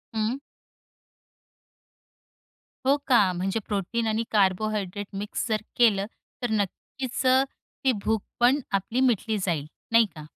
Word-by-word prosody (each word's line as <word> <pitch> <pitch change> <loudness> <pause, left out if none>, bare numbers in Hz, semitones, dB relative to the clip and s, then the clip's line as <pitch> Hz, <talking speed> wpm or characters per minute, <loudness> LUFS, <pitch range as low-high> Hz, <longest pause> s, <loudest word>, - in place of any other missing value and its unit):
हं. 220 +5 0 2.5
हो 275 +2 +5
का, 210 -8 +5
म्हणजे 190 +5 -1
प्रोटीन 210 +3 -1
आणि 220 +1 +1
कार्बोहायड्रेट 205 0 +1
मिक्स 205 +4 -3
जर 215 -2 0 0.2
केलं, 205 -5 +4 0.4
तर 245 - -1
नक्कीच 220 +5 -3 0.6
ती 265 - +4
भूक 220 -2 +1 0.2
पण 250 +4 +5
आपली 200 +6 0
मिटली 225 -4 +2
जाईल, 155 -5 -1 0.2
नाही 230 0 +6
का. 155 -1 -9
215 Hz, 115 wpm, -26 LUFS, 195-235 Hz, 2.5 s, नाही